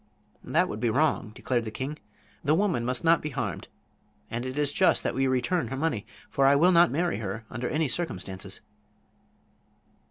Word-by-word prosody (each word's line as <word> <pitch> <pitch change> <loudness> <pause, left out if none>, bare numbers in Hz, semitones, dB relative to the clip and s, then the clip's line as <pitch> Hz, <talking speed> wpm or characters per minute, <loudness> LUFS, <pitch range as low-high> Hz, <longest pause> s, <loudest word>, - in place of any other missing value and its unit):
"That - - +2
would 105 - -5
be 120 0 +1
wrong," 140 -4 +1
declared 120 -2 -1
the 110 - -4
king. 135 +7 -5 0.4
"The 150 +2 +3
woman 175 - +1
must 125 0 -1
not 165 0 +4
be 150 - -3
harmed. 125 - -4 0.6
And 120 +2 -3
it 130 +2 -5
is 145 -1 +1
just - - +4
that - - -1
we 135 0 +1
return 130 +7 +1
her 135 - -4
money, 140 -8 -1 0.2
for 135 0 +2
I 140 - +6
will 170 +6 +5
not 175 0 +6
marry 170 -2 0
her 105 +1 -5
under 120 +2 -3
any 155 0 +1
circumstances." 95 - -3
135 Hz, 185 wpm, -27 LUFS, 120-155 Hz, 0.6 s, I